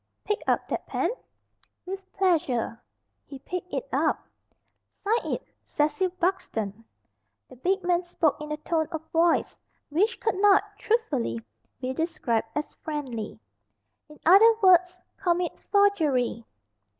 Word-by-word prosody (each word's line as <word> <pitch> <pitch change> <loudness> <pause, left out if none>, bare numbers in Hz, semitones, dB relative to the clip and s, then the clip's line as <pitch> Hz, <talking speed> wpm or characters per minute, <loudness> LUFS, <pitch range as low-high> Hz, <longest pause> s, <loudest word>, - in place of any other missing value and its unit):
"Pick 420 - -1
up - - +1
that - - -4
pen." - - 0 0.7
"With 385 +1 -7
pleasure." 285 - 0 0.5
He 275 - -8
picked 360 +6 -6
it - - -3
up. - - +1 0.6
"Sign 445 +3 -1
it - - -3 0.2
'Cecil 310 +5 0
Buxton."' 225 - -1 0.7
The - - -13
big 375 +8 0
man 350 0 +2
spoke 325 -4 0
in 300 0 -6
a 300 - -2
tone 315 0 -1
of 320 -1 -5
voice 335 0 +2 0.3
which 405 +10 +1
could 375 - -1
not, 410 -1 +6 0.2
truthfully, 295 - 0 0.4
be 255 0 -3
described 260 -8 -1
as 295 0 -3
friendly. 265 -8 -4 0.7
"In 300 - -15
other 395 +7 +8
words 360 -1 +5 0.2
commit 355 -2 0 0.2
forgery." 305 - +2
335 Hz, 125 wpm, -27 LUFS, 280-380 Hz, 0.7 s, other